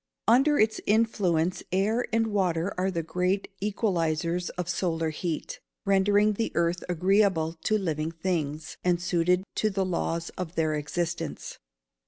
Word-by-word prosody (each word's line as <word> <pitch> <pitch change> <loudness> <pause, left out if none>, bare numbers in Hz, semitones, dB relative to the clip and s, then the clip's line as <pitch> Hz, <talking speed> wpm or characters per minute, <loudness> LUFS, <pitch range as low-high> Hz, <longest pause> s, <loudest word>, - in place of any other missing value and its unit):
_ - - -62 0.2
Under 275 +6 +5
its 215 0 +2
influence 190 -6 +2
air 215 +6 +1
and 225 0 +2
water 190 -4 0
are 185 +1 0
the 170 -3 -2
great 180 +5 -1
equalisers 175 -4 0
of 180 -2 -2
solar 165 -3 -1
heat, 160 0 -4 0.3
rendering 205 +2 +4
the 225 +2 -2
earth 170 +1 +1
agreeable 180 -2 +2
to 215 - +3
living 160 -5 -2
things, 160 -3 -3
and 175 -1 +2
suited 180 +1 +1
to 215 - +1
the 195 -2 -1
laws 170 -2 -2
of 180 -1 -4
their 155 -1 +1
existence. 165 +2 -3
180 Hz, 145 wpm, -27 LUFS, 165-200 Hz, 0.3 s, Under